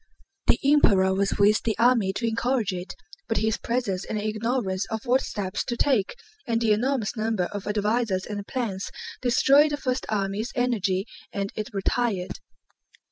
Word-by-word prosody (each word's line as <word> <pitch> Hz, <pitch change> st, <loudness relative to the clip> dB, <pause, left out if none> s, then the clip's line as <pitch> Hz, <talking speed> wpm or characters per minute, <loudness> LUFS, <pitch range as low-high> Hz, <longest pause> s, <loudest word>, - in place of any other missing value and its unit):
The -, -, +5 dB
Emperor 200 Hz, -10 st, +5 dB
was 195 Hz, +1 st, 0 dB
with 210 Hz, +1 st, +4 dB
the 225 Hz, -, -1 dB
army 230 Hz, -5 st, +4 dB
to 230 Hz, +4 st, -2 dB
encourage 230 Hz, -2 st, 0 dB
it, 180 Hz, 0 st, -6 dB, 0.3 s
but 225 Hz, -, 0 dB
his 220 Hz, +1 st, 0 dB
presence 220 Hz, -6 st, -1 dB
and 215 Hz, -, -3 dB
ignorance 215 Hz, -2 st, -1 dB
of 220 Hz, +1 st, -4 dB
what 255 Hz, +2 st, +3 dB
steps 200 Hz, -1 st, -3 dB
to 240 Hz, -, -3 dB
take, 255 Hz, -, +1 dB, 0.3 s
and 230 Hz, -1 st, +1 dB
the 225 Hz, -2 st, +2 dB
enormous 240 Hz, +1 st, 0 dB
number 220 Hz, -3 st, 0 dB
of 205 Hz, -1 st, -6 dB
advisers 210 Hz, -2 st, 0 dB
and 205 Hz, -1 st, -5 dB
plans, 215 Hz, -7 st, -3 dB, 0.3 s
destroyed 275 Hz, +4 st, +5 dB
the 290 Hz, -, -2 dB
first 255 Hz, -3 st, -2 dB
army's 205 Hz, +2 st, -1 dB
energy 210 Hz, -6 st, 0 dB, 0.3 s
and 200 Hz, 0 st, -3 dB
it 215 Hz, -, -4 dB
retired. 200 Hz, -1 st, -1 dB
215 Hz, 160 wpm, -25 LUFS, 200-240 Hz, 0.3 s, The